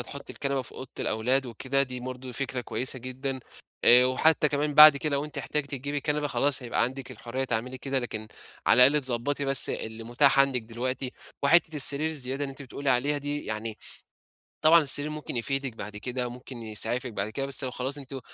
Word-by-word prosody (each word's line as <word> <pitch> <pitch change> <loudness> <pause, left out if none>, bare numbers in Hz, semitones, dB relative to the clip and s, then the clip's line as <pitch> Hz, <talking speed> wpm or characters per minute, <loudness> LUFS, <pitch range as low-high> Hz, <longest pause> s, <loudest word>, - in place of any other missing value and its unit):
هتحطي 140 +3 -9
الكنبة 140 -1 -2
في - - -8
أوضة 130 - -9
الأولاد 125 +5 0
وكده، 130 +4 0
دي 125 -2 -5
برضو 125 0 -7
فكرة 130 -1 -3
كويسة 130 +2 -4
جدًا. 130 +2 -5 0.4
آآ، 125 +1 +7
وحتى 150 +4 +3
كمان 145 +1 -1
بعد 150 -1 +10
كده 150 +1 -2
لو 140 - -2
أنتِ 150 -1 -8
احتجتِ 140 +3 -3
تجيبي 145 +1 -3
كنبة 150 +1 -1
خلاص 140 -1 0
هيبقى 120 - -1
عندِك 130 +2 -3
الحرية 125 +2 -5
تعملي 125 +1 -3
كده، 135 +1 -2
لكن 110 -3 -6 0.4
على 125 +2 +7
الأقل 145 0 +1
تضبّطي 130 +3 -2
بس 135 -1 +3
اللي 110 0 -5
متاح 135 +4 +4
عندِك 135 -3 +2
دلوقتي. 125 +3 -4 0.3
وحتّة 160 +2 +4
السرير 145 +2 +6
الزيادة 140 -2 -2
اللي 135 - -5
أنتِ 135 +1 -10
بتقولي 140 +1 -3
عليها 140 +4 +1
دي 145 +1 -4
يعني 110 0 -5 0.8
طبعًا 160 +2 +6
السرير 145 0 +2
ممكن 150 -4 -6
يفيدِك 135 +1 -1
بعد 105 +1 -7
كده، 125 +3 -3
ممكن 125 0 -10
يسعفِك 115 +3 -1
بعد 105 0 -3
كده، 135 +5 -3
بس 140 0 +1
لو 130 - -2
خلاص 130 +3 -3
أنتم 135 -1 -7
130 Hz, 195 wpm, -27 LUFS, 125-140 Hz, 0.8 s, بعد